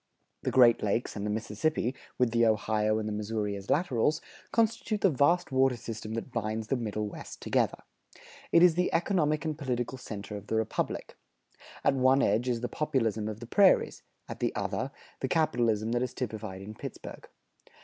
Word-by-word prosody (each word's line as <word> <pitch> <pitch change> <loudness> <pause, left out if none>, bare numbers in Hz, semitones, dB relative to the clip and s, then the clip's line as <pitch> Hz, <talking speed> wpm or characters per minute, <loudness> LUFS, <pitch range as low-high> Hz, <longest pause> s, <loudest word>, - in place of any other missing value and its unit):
The - - -1
Great 120 -3 +6
Lakes 105 +3 -1
and 100 0 -3
the - - -2
Mississippi, 115 +5 -1 0.2
with 125 -2 +2
the 115 0 +3
Ohio 110 -1 +2
and 110 -1 -2
the 105 - -2
Missouri 105 -1 -2
as 100 0 -9
laterals, 150 -1 +2 0.3
constitute 225 -2 +1
the 195 - +4
vast 145 +6 +2
water 130 -1 +3
system 110 -1 -6
that 115 +3 -5
binds 110 -1 -3
the - - +2
Middle 105 -3 -2
West - - -9
together. - - +1 0.7
It 170 - +6
is 180 -2 +7
the 180 +2 +1
economic 165 -4 +1
and 155 -1 -1
political 130 -3 -3
center 105 -4 -7
of 105 0 -8
the - - -1
Republic. 110 -1 -2 0.7
At - - +4
one 130 +1 +4
edge 115 +5 +2
is 120 -2 -1
the 125 - -1
Populism 115 -8 -1
of 110 +1 -6
the - - -6
prairies; 195 - +4 0.3
at - - -7
the - - -1
other, - - -2 0.3
the - - -1
capitalism 115 -9 +1
that 120 0 +1
is 125 -1 -3
typified 110 -5 -5
in 105 +2 -8
Pittsburgh. - - -9
115 Hz, 180 wpm, -29 LUFS, 110-140 Hz, 0.7 s, is